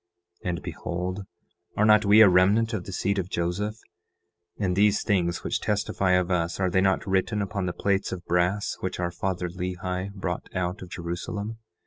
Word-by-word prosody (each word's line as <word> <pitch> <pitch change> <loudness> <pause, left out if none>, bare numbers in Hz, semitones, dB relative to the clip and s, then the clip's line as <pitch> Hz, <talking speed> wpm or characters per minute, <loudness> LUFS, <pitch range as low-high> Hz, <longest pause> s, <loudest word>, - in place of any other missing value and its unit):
And 85 -4 -3
behold, 90 +3 -4 0.5
are 105 - +4
not 105 -1 +6
we 105 +2 +7
a 110 - +10
remnant 100 +6 +4
of 110 - -3
the - - -7
seed 100 +2 0
of 90 -1 -3
Joseph? 90 +5 -1 0.8
And 95 -3 0
these 105 +1 +3
things 90 -4 0
which - - -1
testify 100 -2 0
of 90 0 +2
us, 85 0 0
are 95 -2 +1
they 95 - +3
not 95 0 +2
written 95 +2 +1
upon 95 -1 -2
the - - 0
plates 100 +1 0
of 90 -1 -6
brass 90 +4 +1
which 95 - -4
our 85 -1 -1
father 90 0 -2
Lehi 90 +1 -4
brought 95 -3 -4
out 90 +1 -2
of 90 - -8
Jerusalem? 100 +6 -5
95 Hz, 180 wpm, -26 LUFS, 90-100 Hz, 0.8 s, a